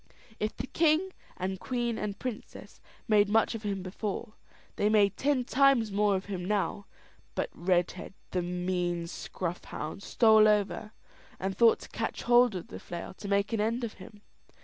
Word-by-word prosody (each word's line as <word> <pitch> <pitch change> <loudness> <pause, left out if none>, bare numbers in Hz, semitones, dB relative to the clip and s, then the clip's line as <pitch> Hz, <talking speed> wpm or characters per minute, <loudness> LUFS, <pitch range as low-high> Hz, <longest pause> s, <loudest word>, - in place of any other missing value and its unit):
If 215 +1 -2
the - - -3
king, 325 +6 +2 0.2
and 190 0 -3
queen, 240 -1 -2
and 205 -2 -3
princess, 245 -2 -7 0.3
made 210 -2 +4
much 225 +3 +3
of 225 - -5
him 200 -3 -3
before, 205 +3 -4 0.4
they 205 - +2
made 205 -2 +4
ten 275 -2 +1
times 260 -5 +4
more 205 0 +2
of 190 - -3
him 190 -3 -4
now; 205 +1 -1 0.5
but - - -2
Redhead, 180 +1 -1 0.2
the 180 - 0
mean 175 -1 -1
scruff 175 +1 -5
hound, 155 +6 -6
stole 220 0 +5
over, 210 -1 +1 0.5
and 190 0 -2
thought 230 +2 +5
to - - -11
catch - - -4
hold 240 -2 +5
of 180 - -6
the 95 - -8
flail 175 - -7
to 200 - -9
make 200 +2 +1
an 220 - +1
end 230 +3 0
of 230 - -3
him. 210 -1 -12
205 Hz, 170 wpm, -29 LUFS, 185-225 Hz, 0.5 s, stole